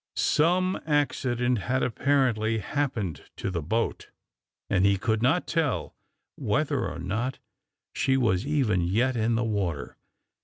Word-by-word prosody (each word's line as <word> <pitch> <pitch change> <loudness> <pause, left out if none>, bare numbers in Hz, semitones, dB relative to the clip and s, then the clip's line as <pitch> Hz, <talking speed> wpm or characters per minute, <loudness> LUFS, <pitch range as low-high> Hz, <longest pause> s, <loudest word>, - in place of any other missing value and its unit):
Some 180 +4 +2
accident 125 -5 +1
had, 130 +5 0
apparently, 120 -4 +1
happened 110 - -2
to - - -3
the 85 -3 -2
boat, 110 +9 -2 0.6
and 95 - +2
he 100 0 +4
could 110 +2 0
not 140 +9 +2
tell 140 - -1 0.4
whether - - 0
or - - -7
not 115 +9 -2 0.6
she 135 0 +2
was 110 -7 +2
even 130 -11 +2
yet 115 +9 +1
in 115 0 +1
the 115 - +1
water. 100 -9 -2
115 Hz, 130 wpm, -27 LUFS, 100-135 Hz, 0.6 s, he